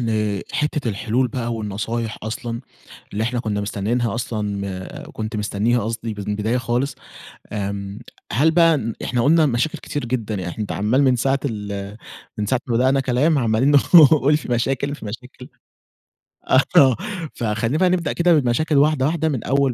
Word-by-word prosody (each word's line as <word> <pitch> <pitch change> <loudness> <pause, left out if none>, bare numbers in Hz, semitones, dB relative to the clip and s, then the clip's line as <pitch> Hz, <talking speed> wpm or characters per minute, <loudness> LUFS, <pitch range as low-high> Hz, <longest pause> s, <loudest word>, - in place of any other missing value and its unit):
لحتة 115 +6 -1
الحلول 120 +4 0
بقى 120 -1 -3
والنصايح 110 +1 -3
أصلًا 115 +2 -4 0.5
اللي 105 +2 -1
إحنا 120 +1 -1
كنا 105 -3 -2
مستنينها 110 +4 -1
أصلًا 115 -2 -3 0.6
م - - -12
كنت 110 0 -4
مستنيها 105 +3 0
قصدي 110 0 -4
ب 105 - -7
من 100 - -7
البداية 110 +4 0
خالص، 125 +3 -1 0.6
آمم 100 0 -4 0.3
هل 145 +10 +4
بقى 165 -1 +4
ن 115 -4 -3
إحنا 120 -1 0
قلنا 160 +3 +4
مشاكل 125 +4 -1
كتير 145 - -5
جدًا، 115 -3 -2
يعني 90 -3 -4
إحن 100 - -7
أنتَ 105 - -3
عمَّال 110 +7 +1
من 130 -2 +3
ساعة 135 +3 +1
ال 105 -4 -4 0.4
من 105 - -1
ساعة 125 +2 +1
ما 120 - -1
بدأنا 130 +3 +3
كلام 135 +5 +2
عمالين 115 +2 +2 0.2
نقول 150 -2 +7
في 155 - -7
مشاكل 135 +4 0
في 150 - -11
مشاكل 125 +4 -9 1.0
آه، - - +5 0.2
ف 175 - +8 0.6
فخلينا 115 +5 0
بقى 185 +2 +3
نبدأ 175 -4 0
كده 175 0 +3
بالمشاكل 150 +2 +2
واحدة 145 -2 +3
واحدة، 160 +1 0
من 135 -6 -3
أول 135 -1 +1
120 Hz, 170 wpm, -21 LUFS, 110-140 Hz, 1.0 s, ف